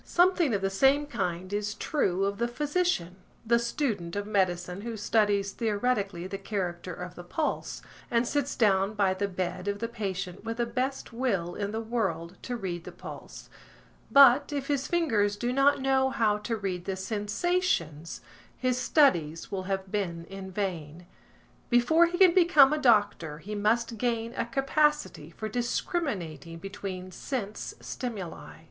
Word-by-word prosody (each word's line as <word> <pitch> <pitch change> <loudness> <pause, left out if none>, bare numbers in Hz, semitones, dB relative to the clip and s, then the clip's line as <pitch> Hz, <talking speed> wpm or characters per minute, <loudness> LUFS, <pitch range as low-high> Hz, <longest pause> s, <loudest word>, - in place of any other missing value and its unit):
Something 350 - +3
of 195 - -2
the 195 - +1
same 270 +8 +4
kind 185 - -3
is 205 0 -2
true 195 - 0
of 200 +1 -2
the 235 - +1
physician, 290 - -1 0.3
the 235 +1 +4
student 225 - -2
of 205 0 -2
medicine 185 -2 0
who 230 0 -5
studies 205 -2 +2
theoretically 205 -5 -1
the 195 +1 -5
character 185 -3 -3
of 180 0 -7
the 175 - -10
pulse, 300 - -3 0.3
and 235 0 +2
sits 285 0 -1
down 200 -2 +2
by 195 -2 +2
the 200 +2 -1
bed 185 0 -4
of 200 0 0
the 230 +3 -3
patient 195 -5 -4
with 225 0 -4
the 240 - +1
best 255 +2 -3
will 200 -9 -1
in 200 +1 -3
the 220 +2 -3
world 195 -7 -2
to 250 - -4
read 175 -5 -4
the - - -8
pulse, - - -10 0.6
but, 275 +1 +7
if 280 -1 -3
his 285 -1 0
fingers 225 -13 +1
do 240 +3 -1
not 275 +2 +4
know 265 0 +3
how 220 -6 +1
to 225 +2 -2
read 185 -4 -3
the 195 - -2
sensations 205 - -1 0.4
his 255 -1 0
studies 170 - +2
will 190 -2 -2
have 190 -1 -2
been 170 -5 -2
in 195 +1 -8
vain. 175 -4 -4 0.6
Before 260 +8 +5
he 350 +1 -3
can 370 -2 +7
become 310 -6 +6
a 305 - 0
doctor, 205 - +2
he 205 +7 -7
must 225 +2 0
gain 230 -1 -1
a 230 - -2
capacity 275 - +1
for 215 +6 -6
discriminating 210 - -2
between 190 0 -6
sense 210 +1 -5
stimuli. 215 -9 -6
210 Hz, 160 wpm, -28 LUFS, 185-255 Hz, 0.6 s, but